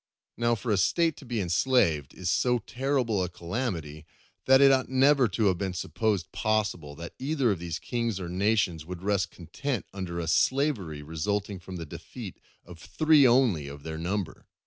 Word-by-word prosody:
Now, 120 0 +1
for 110 +1 -3
a 105 - +3
State 165 - +2
to 135 - -12
be 120 -2 -2
enslaved 85 - +1
is 90 -2 -2
so 125 -1 +2
terrible 125 -3 -1
a 90 - -3
calamity 85 - -4 0.4
that 135 0 +7
it 140 0 +7
ought 130 -1 +2
never 135 0 +4
to 105 +2 -1
have 95 -3 +2
been 95 -2 -2
supposed 95 +2 -1
possible 105 -9 -1
that 85 +2 -8
either 135 -3 +1
of 95 - -2
these 85 -1 -4
kings 115 -4 -2
or 90 - -5
nations 95 -3 +1
would 90 +2 -8
rest 100 -4 +1
content 120 - -4
under 90 -3 -4
a 85 - -3
slavery 95 - +1
resulting 100 +6 -2
from 95 +1 -9
the 85 -2 -5
defeat 75 - -9 0.3
of 85 -2 -12
three 155 - +4
only 120 - +3
of 70 0 -9
their 80 0 -5
number. 95 +2 -3
100 Hz, 180 wpm, -28 LUFS, 85-125 Hz, 0.4 s, that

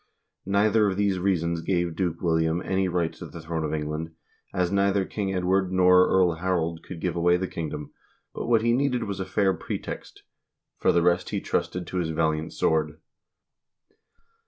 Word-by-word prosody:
Neither 105 +2 +3
of 95 - -3
these 100 -2 +1
reasons 85 -3 0
gave 85 -2 -1
Duke 85 -3 -2
William 80 0 +1
any 95 0 +1
right 85 -2 -1
to - - -9
the - - -10
throne 80 0 -3
of 75 - -2
England, 80 +1 -4 0.4
as 90 -1 0
neither 100 0 +2
King 100 -1 -3
Edward 95 0 +1
nor 90 0 +5
Earl 95 -2 +4
Harold 85 -2 -1
could 90 - -9
give 90 +1 -2
away 85 +1 +3
the 95 +1 -2
kingdom, 75 -3 -6 0.4
but - - -5
what 115 -2 +3
he 120 0 +3
needed 130 -1 +1
was 100 -2 -4
a 95 - -2
fair 95 -1 +1
pretext; 85 - -6 0.6
for - - +3
the 85 - +2
rest 90 +1 +2
he - - -1
trusted 90 -1 -2
to 90 - -5
his 85 -3 -1
valiant 80 -1 0
sword. 75 -1 0
90 Hz, 180 wpm, -26 LUFS, 80-95 Hz, 0.6 s, nor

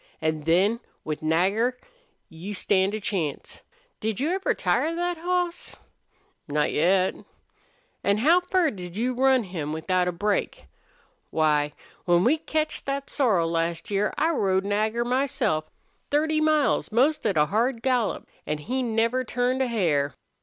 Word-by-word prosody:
An' 155 0 -1
then, 185 +9 +2 0.2
with 155 -1 -4
Nagger, 195 +10 +1 0.5
you 180 +6 -7
stand 195 +1 +1
a - - -3
chance. 180 -8 -4 0.4
Did 220 -2 -2
you 300 +6 0
ever 380 +1 0
tire 330 +1 0
thet 350 -1 -2
hoss?" 355 0 -2 0.7
"Not 150 0 0
yet." 185 +4 +2 0.9
"An' 200 +1 +2
how 320 +11 +5
fur 360 -3 +1
did 180 -2 -8
you 245 +3 0
ever 250 +1 -5
run 265 -2 +4
him 165 -6 -4
without 180 +3 0
a - - +1
break? 205 +4 -2 0.6
Why, 150 -2 +1 0.3
when 175 0 +4
we 300 +7 +3
ketched 310 0 -2
thet 275 0 -3
sorrel 195 - +2
last 165 +2 -2
year 205 +1 +1
I 325 +2 +2
rode 195 - +1
Nagger 215 +3 0
myself 245 - 0 0.4
thirty 310 +1 +1
miles, 310 -5 +2
most 270 +8 +2
at 195 - 0
a 150 - +5
hard 230 - 0
gallop. 250 -5 0 0.2
An' 150 - -1
he 250 - -3
never 230 +2 +1
turned 250 +2 0
a 260 - +2
hair!" 160 -11 0
215 Hz, 155 wpm, -25 LUFS, 175-265 Hz, 0.9 s, how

